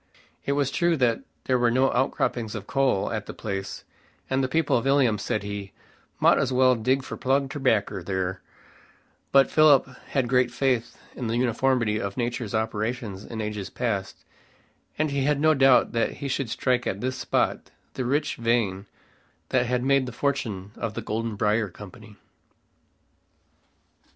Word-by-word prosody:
It 140 - +2
was 140 -2 0
true 170 -1 +2
that 120 -4 +2 0.2
there 130 -1 +1
were 120 -1 +3
no 130 +3 +3
outcroppings 120 -3 -1
of 105 -2 -6
coal 135 -7 +1
at 110 -2 -4
the - - -7
place, 95 -2 -5 0.5
and 135 0 +2
the - - +1
people 160 -2 +2
at 120 - -4
Ilium 130 -6 +3
said - - -2
he 100 -1 -6 0.5
"mought - - +5
as 135 -1 0
well 130 0 +5
dig 130 +3 +1
for - - -6
plug 135 +1 0
terbaccer 125 -9 0
there;" 95 0 -2 0.9
but 135 0 +5
Philip 150 -4 +6 0.2
had 130 -3 0
great 125 0 +3
faith 120 -2 -1 0.2
in 125 - -4
the 115 +1 -1
uniformity 120 -3 +1
of 100 0 -4
nature's 120 -2 -2
operations 110 -1 -2
in 115 -2 -5
ages 105 -3 -4
past, 105 -6 -3 0.7
and 155 -1 0
he 140 -1 0
had 145 -1 +2
no 155 +1 +4
doubt 135 -3 +5
that 115 -1 0
he 140 - -6
should 135 -2 -2
strike 125 +1 0
at 95 - -2
this 130 +2 -2
spot - - -1 0.2
the 130 - -3
rich 140 +5 0
vein 115 -5 0 0.6
that 125 -1 +2
had 125 0 0
made 135 -1 +2
the - - -5
fortune 110 -7 -2
of 115 -2 -4
the - - -4
Golden 110 +1 -3
Briar 105 +1 +1
Company. 105 +3 -12
120 Hz, 165 wpm, -25 LUFS, 105-135 Hz, 0.9 s, Philip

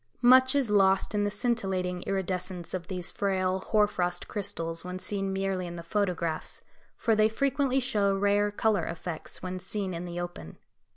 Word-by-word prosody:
Much 260 +2 +7
is 265 -7 +2
lost 195 -1 +4
in 205 0 +1
the - - +1
scintillating 195 -5 -1
iridescence 185 -2 -2
of 180 -2 -4
these 180 -2 -3
frail 190 -1 0
hoar 210 -1 +5
frost 180 -3 -2
crystals 165 -5 -3
when 180 0 -5
seen 195 0 -2
merely 190 -1 -1
in 170 - -6
the 170 - -7
photographs, 175 -3 -1 0.4
for 225 -2 +2
they 215 0 +4
frequently 275 +2 +1
show 205 -6 +1
rare 205 +1 +3
colour 205 -3 +1
effects 165 0 -6
when 185 0 -4
seen 195 0 -3
in 170 +1 -4
the 175 0 -5
open. 175 - -7
195 Hz, 170 wpm, -28 LUFS, 180-210 Hz, 0.4 s, Much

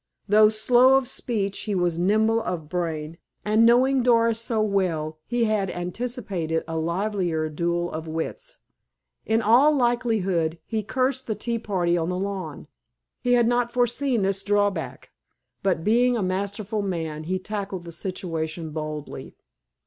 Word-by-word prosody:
Though 210 +1 +6
slow 245 +4 +4
of 265 -2 -1
speech 200 -6 -2
he 210 -2 -1
was 175 -2 0
nimble 220 +5 +2
of 175 -7 -4
brain, 165 -1 -3 0.3
and, 215 +2 +4
knowing 255 +3 +4
Doris 230 -2 +3
so 230 -1 -2
well, 175 -7 0
he 240 -1 0
had 215 -3 +1
anticipated 180 -3 -3
a 165 - -4
livelier 170 -1 -1
duel 170 +2 -1
of 160 +1 -5
wits. 165 - -5 0.7
In 225 +1 +2
all 260 +8 +5
likelihood, 220 - +1
he 220 -1 -2
cursed 260 +4 -1
the 220 - -1
tea 235 +1 -2
party 175 -5 0
on 165 +1 -1
the 180 - -2
lawn. 190 -5 -4 0.6
He 245 - +2
had 240 -2 +4
not 240 0 +1
foreseen 245 -1 +1
this 195 0 0
drawback. 205 0 -1 0.5
But, 185 -4 0
being 240 +4 +3
a 215 - -1
masterful 200 +3 -2
man, 160 -5 -3
he 185 +3 -1
tackled 195 -1 -5
the 170 - -9
situation 165 -2 -4
boldly. 155 -1 -6
200 Hz, 150 wpm, -24 LUFS, 170-230 Hz, 0.7 s, Though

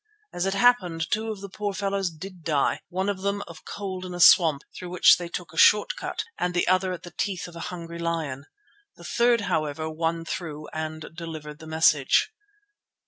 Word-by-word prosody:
As 175 +2 -1
it 195 - 0
happened 190 -8 +2
two 220 +1 0
of 210 -3 -5
the 200 - -6
poor 200 +1 -4
fellows 195 -1 -1
did 175 +2 -10
die, 150 -4 +1
one 190 +2 -2
of 200 -2 -2
them 200 +1 -1
of 170 -2 -12
cold 190 -2 -5
in 180 -1 -6
a - - -6
swamp 160 -5 +6
through 180 - -7
which 180 0 +6
they 175 -1 -6
took 170 -2 -6
a - - -12
short 210 - +5
cut, - - -4 0.2
and 180 0 -1
the 175 - +1
other 185 +1 +2
at 180 -2 -6
the 175 - -9
teeth 185 +1 -3
of 175 - -13
a - - -7
hungry 170 -1 -7
lion. 160 -5 -3 0.5
The - - -15
third, 235 -1 +2
however, 155 -5 -1
won 165 +1 -2
through 155 -4 -5
and 155 0 -5
delivered 160 -3 -8
the 160 - -11
message. 160 - +3
175 Hz, 200 wpm, -26 LUFS, 160-195 Hz, 0.5 s, swamp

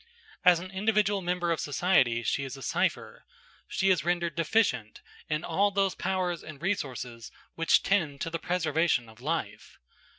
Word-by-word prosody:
As 180 -2 +6
an 185 +2 -8
individual 205 0 +1
member 175 -1 -1
of 165 - 0
society, 135 -6 +2
she 140 +5 0
is 135 0 -6
a 135 - -10
cypher. - - -1 0.4
She 190 0 +2
is 180 - +2
rendered 170 -1 0
deficient 160 - +1 0.3
in 150 0 -1
all 195 +5 +2
those 195 -1 +1
powers 180 -2 -2
and 155 -3 -10
resources 130 - -4 0.2
which 165 0 +3
tend 155 -8 +1
to 165 - -2
the 165 - -2
preservation 160 -7 +1
of 110 +1 -16
life. 130 -8 -4
170 Hz, 160 wpm, -28 LUFS, 140-185 Hz, 0.4 s, As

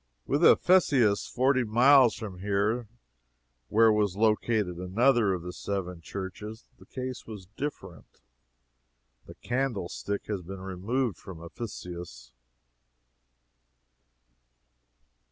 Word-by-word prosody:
With 145 +5 0
Ephesus, 140 - +4
forty 130 +1 +2
miles 120 +1 +5
from 105 -5 -8
here, 105 +4 0 0.8
where 110 +5 +5
was 105 -3 +1
located 105 -3 +1
another 110 +4 +2
of 90 -3 -3
the 90 0 -6
seven 90 -4 -4
churches, 100 +5 -7
the - - -17
case 130 -1 -6
was 105 -4 -9
different. 145 +4 -7 1.1
The - - -11
"candlestick" 110 -6 -3
has 105 -3 -3
been 95 +2 -9
removed 100 +4 -2
from 90 -4 -10
Ephesus. 85 - -8
105 Hz, 100 wpm, -28 LUFS, 95-120 Hz, 1.1 s, miles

